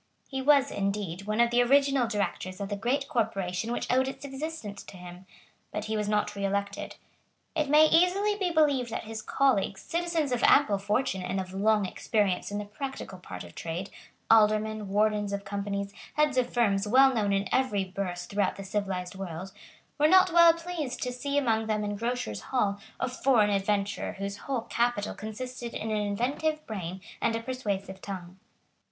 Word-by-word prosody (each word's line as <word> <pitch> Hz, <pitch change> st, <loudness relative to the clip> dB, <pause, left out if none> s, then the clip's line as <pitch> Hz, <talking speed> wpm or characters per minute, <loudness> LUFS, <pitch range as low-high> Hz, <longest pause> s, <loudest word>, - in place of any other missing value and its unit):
He 270 Hz, -1 st, -3 dB
was, 280 Hz, 0 st, +4 dB
indeed, 195 Hz, -2 st, -3 dB
one 215 Hz, +1 st, -1 dB
of 235 Hz, 0 st, +4 dB
the 240 Hz, 0 st, +4 dB
original 275 Hz, 0 st, +4 dB
Directors 200 Hz, -3 st, -3 dB
of 200 Hz, -1 st, -4 dB
the 205 Hz, -, -1 dB
great 250 Hz, +7 st, -1 dB
corporation 205 Hz, -5 st, -1 dB
which 240 Hz, -, -2 dB
owed 260 Hz, +1 st, +3 dB
its 270 Hz, +1 st, -6 dB
existence 270 Hz, -6 st, -6 dB
to 190 Hz, -, -12 dB
him; 180 Hz, +1 st, -11 dB, 0.4 s
but 210 Hz, 0 st, -4 dB
he 220 Hz, 0 st, -2 dB
was 210 Hz, -1 st, -1 dB
not 210 Hz, 0 st, +1 dB
reelected. 200 Hz, 0 st, -2 dB, 0.6 s
It 305 Hz, -3 st, 0 dB
may 300 Hz, +2 st, +7 dB
easily 365 Hz, +6 st, +3 dB
be 385 Hz, -3 st, 0 dB
believed 290 Hz, -7 st, +2 dB
that 225 Hz, -, -4 dB
his 220 Hz, 0 st, -6 dB
colleagues, 215 Hz, -7 st, +1 dB
citizens 335 Hz, -4 st, -1 dB
of 245 Hz, -1 st, 0 dB
ample 210 Hz, -9 st, +5 dB
fortune 205 Hz, 0 st, 0 dB
and 185 Hz, +1 st, -2 dB
of 185 Hz, 0 st, -5 dB
long 210 Hz, +1 st, +2 dB
experience 195 Hz, -1 st, 0 dB
in 205 Hz, -, -3 dB
the 210 Hz, -, -4 dB
practical 210 Hz, -3 st, -6 dB
part 90 Hz, -, -8 dB
of 85 Hz, -1 st, -12 dB
trade, 170 Hz, +4 st, -5 dB, 0.4 s
aldermen, 215 Hz, -1 st, +3 dB
wardens 210 Hz, 0 st, +1 dB
of 200 Hz, 0 st, -4 dB
companies, 200 Hz, 0 st, -3 dB, 0.2 s
heads 300 Hz, -2 st, +2 dB
of 250 Hz, -1 st, +1 dB
firms 210 Hz, -4 st, +2 dB
well 265 Hz, +4 st, +6 dB
known 210 Hz, -4 st, +1 dB
in 195 Hz, 0 st, +1 dB
every 230 Hz, -7 st, +1 dB
Burse 185 Hz, -2 st, -4 dB
throughout 200 Hz, 0 st, 0 dB
the 195 Hz, -, -7 dB
civilised 190 Hz, -2 st, -3 dB
world, 190 Hz, -1 st, -6 dB, 0.5 s
were 300 Hz, -, +6 dB
not 370 Hz, +1 st, +6 dB
well 340 Hz, -1 st, +8 dB
pleased 335 Hz, -5 st, -4 dB
to 250 Hz, -1 st, -2 dB
see 280 Hz, +3 st, -2 dB
among 225 Hz, -5 st, +1 dB
them 215 Hz, -1 st, 0 dB
in 205 Hz, 0 st, -2 dB
Grocers' 225 Hz, -, -3 dB
Hall 205 Hz, -6 st, +1 dB, 0.2 s
a -, -, 0 dB
foreign 245 Hz, -4 st, +3 dB
adventurer 200 Hz, 0 st, 0 dB
whose 200 Hz, +1 st, -5 dB
whole 265 Hz, 0 st, -3 dB
capital 235 Hz, -2 st, -1 dB
consisted 235 Hz, +3 st, -6 dB
in 220 Hz, -, -3 dB
an 215 Hz, -, +1 dB
inventive 275 Hz, +9 st, -1 dB
brain 190 Hz, -3 st, -5 dB, 0.2 s
and 225 Hz, -, +1 dB
a -, -, -1 dB
persuasive 200 Hz, -7 st, -4 dB
tongue. 185 Hz, -2 st, -7 dB
215 Hz, 180 wpm, -28 LUFS, 200-265 Hz, 0.6 s, well